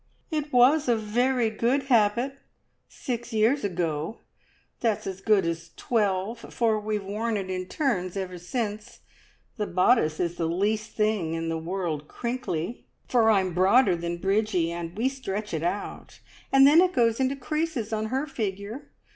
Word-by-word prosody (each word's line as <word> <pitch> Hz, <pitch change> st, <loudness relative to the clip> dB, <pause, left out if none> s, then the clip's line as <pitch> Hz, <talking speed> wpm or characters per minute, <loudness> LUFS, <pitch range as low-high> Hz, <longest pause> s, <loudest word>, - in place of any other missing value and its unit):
"It 300 Hz, -1 st, -2 dB
was 255 Hz, +4 st, +5 dB
a 240 Hz, -, +4 dB
very 230 Hz, +2 st, +1 dB
good 240 Hz, +6 st, +1 dB
habit 245 Hz, +2 st, +2 dB, 0.5 s
six 240 Hz, -1 st, -5 dB
years 225 Hz, +6 st, +2 dB
ago! 170 Hz, -1 st, -2 dB, 0.6 s
That's 225 Hz, -4 st, 0 dB
as 190 Hz, 0 st, -5 dB
good 205 Hz, -3 st, +3 dB
as 165 Hz, 0 st, -3 dB
twelve, 210 Hz, -1 st, 0 dB
for 225 Hz, -2 st, 0 dB
we've 210 Hz, -1 st, -2 dB
worn 215 Hz, +3 st, -2 dB
it 190 Hz, -2 st, -4 dB
in 185 Hz, 0 st, -3 dB
turns 195 Hz, -, -1 dB
ever 185 Hz, -2 st, -4 dB
since. 210 Hz, +3 st, -4 dB, 0.6 s
The 210 Hz, -2 st, -2 dB
bodice 180 Hz, -4 st, +3 dB
is 175 Hz, 0 st, -1 dB
the 165 Hz, -, 0 dB
least 210 Hz, +5 st, -1 dB
thing 210 Hz, -7 st, 0 dB
in 165 Hz, 0 st, -3 dB
the 165 Hz, -, -1 dB
world 165 Hz, -3 st, -3 dB
crinkly, 235 Hz, -5 st, -4 dB, 0.2 s
for 230 Hz, -3 st, +4 dB
I'm 190 Hz, -4 st, +2 dB
broader 190 Hz, +3 st, +4 dB
than 170 Hz, 0 st, -3 dB
Bridgie, 195 Hz, -2 st, +1 dB
and 170 Hz, +1 st, -6 dB
stretch 210 Hz, -6 st, -5 dB
it 160 Hz, -, -1 dB
out, 175 Hz, +4 st, -4 dB, 0.3 s
and 270 Hz, 0 st, +7 dB
then 300 Hz, +5 st, +7 dB
it 365 Hz, 0 st, +2 dB
goes 230 Hz, -1 st, +2 dB
into 265 Hz, +1 st, +1 dB
creases 280 Hz, -5 st, -2 dB
on 215 Hz, 0 st, -1 dB
her 265 Hz, +5 st, -1 dB
figure. 220 Hz, +1 st, -5 dB
215 Hz, 155 wpm, -26 LUFS, 185-245 Hz, 0.6 s, and